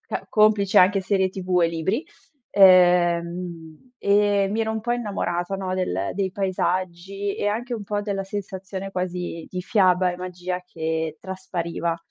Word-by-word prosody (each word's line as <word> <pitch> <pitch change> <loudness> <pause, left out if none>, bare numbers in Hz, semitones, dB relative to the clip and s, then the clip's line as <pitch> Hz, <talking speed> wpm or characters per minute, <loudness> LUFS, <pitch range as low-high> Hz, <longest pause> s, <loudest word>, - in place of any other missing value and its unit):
ca - - -6
complici 210 -2 +4
anche 195 +2 +5
serie 190 0 +1
TV 185 -2 0
e 165 - +4
libri. 170 - -1 0.5
Ehm, 175 0 +3
e 200 -1 +3
mi 220 +2 -1
ero 220 0 0
un 220 - -3
po' 240 +2 -1
innamorata, 195 -6 -2
no, 185 -1 -3
del 100 - -1
dei 190 -1 -1
paesaggi 185 +1 -2
e - - -2
anche 235 +4 -2
un 210 -3 -6
po' 205 +1 -2
della 195 -2 -3
sensazione 195 -1 -6
quasi 180 -3 -4
di 180 -1 -5
fiaba 185 -2 +3
e - - -7
magia 180 0 -5
che 160 -2 -3
traspariva. 170 -3 -3
185 Hz, 155 wpm, -23 LUFS, 175-200 Hz, 0.5 s, anche